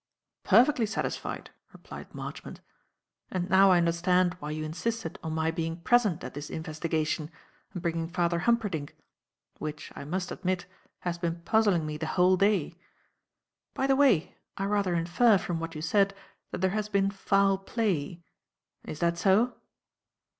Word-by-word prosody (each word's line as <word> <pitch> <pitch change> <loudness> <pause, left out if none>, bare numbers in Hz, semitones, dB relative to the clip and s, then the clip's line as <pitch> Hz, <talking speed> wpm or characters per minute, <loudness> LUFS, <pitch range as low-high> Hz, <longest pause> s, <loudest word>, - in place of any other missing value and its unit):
"Perfectly 235 +3 +4
satisfied," 215 - -4 0.2
replied - - -11
Marchmont. - - -7 0.7
"And 180 -1 -2
now 195 +1 +7
I 185 - +6
understand 175 +1 +2
why 150 - -6
you 155 0 -3
insisted 170 +4 -3
on 160 - -4
my 160 0 0
being 165 0 -3
present 215 -4 +2
at 125 - -6
this 145 +1 -7
investigation 155 -1 -2 0.4
and 180 - -7
bringing 165 -1 -1
Father 170 -1 0
Humperdinck; 200 -8 0 0.6
which, 150 0 -6
I 140 - -7
must 180 +4 -3
admit, 185 -1 -2 0.4
has 175 -1 -3
been 170 -1 -2
puzzling 200 -4 +2
me 150 0 -4
the 160 +1 -4
whole 180 +1 +5
day. 185 -3 +1 1.0
By 270 - 0
the 270 0 +3
way, 260 - +3 0.2
I 195 - -1
rather 200 -3 +1
infer, 175 +7 +4
from 175 -2 -3
what 165 0 -5
you 155 - -5
said, 195 +4 +2 0.3
that - - -5
there 190 -1 +2
has 210 0 -2
been 200 -1 +2
foul 195 0 +2
play. 185 -6 -2 0.6
Is 155 - -7
that 170 0 +1
so?" 210 +7 +3
180 Hz, 155 wpm, -28 LUFS, 165-200 Hz, 1.0 s, now